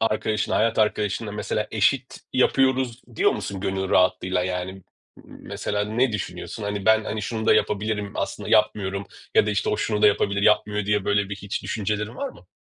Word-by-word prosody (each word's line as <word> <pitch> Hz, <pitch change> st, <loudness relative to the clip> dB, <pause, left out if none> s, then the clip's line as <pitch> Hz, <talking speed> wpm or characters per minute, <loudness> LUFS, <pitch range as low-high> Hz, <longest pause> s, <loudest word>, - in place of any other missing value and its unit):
arkadaşına, 110 Hz, -1 st, 0 dB
hayat 115 Hz, 0 st, +2 dB
arkadaşına, 105 Hz, 0 st, 0 dB
mesela 105 Hz, 0 st, -2 dB
eşit 125 Hz, +5 st, +1 dB
yapıyoruz 130 Hz, -1 st, +2 dB
diyor -, -, +4 dB
musun 100 Hz, -2 st, -5 dB
gönül 95 Hz, -1 st, -2 dB
rahatlığıyla? 90 Hz, 0 st, +2 dB
Yani, 90 Hz, 0 st, -3 dB
m 95 Hz, 0 st, -13 dB, 0.4 s
mesela 105 Hz, 0 st, -4 dB
ne 115 Hz, +3 st, +1 dB
düşünüyorsun? 105 Hz, +1 st, -5 dB
Hani, 100 Hz, -1 st, -3 dB
ben, 110 Hz, 0 st, +5 dB
hani 110 Hz, 0 st, -3 dB
şunu 110 Hz, +2 st, -3 dB
da -, -, +6 dB
yapabilirim, 105 Hz, 0 st, 0 dB
aslında -, -, -4 dB
yapmıyorum 100 Hz, -1 st, +1 dB, 0.3 s
ya -, -, +5 dB
da, -, -, +1 dB
işte, 100 Hz, -, 0 dB
o -, -, +1 dB
şunu 105 Hz, -1 st, -1 dB
da 105 Hz, -, +8 dB
yapabilir, 100 Hz, 0 st, +2 dB
yapmıyor 105 Hz, -1 st, +2 dB
diye, 105 Hz, -1 st, +1 dB
böyle, 100 Hz, -1 st, +1 dB
bir 100 Hz, -, -5 dB
hiç 100 Hz, 0 st, -5 dB
düşüncelerin 105 Hz, 0 st, -2 dB
var 280 Hz, 0 st, -3 dB
mı? -, -, -15 dB
105 Hz, 180 wpm, -24 LUFS, 100-110 Hz, 0.4 s, da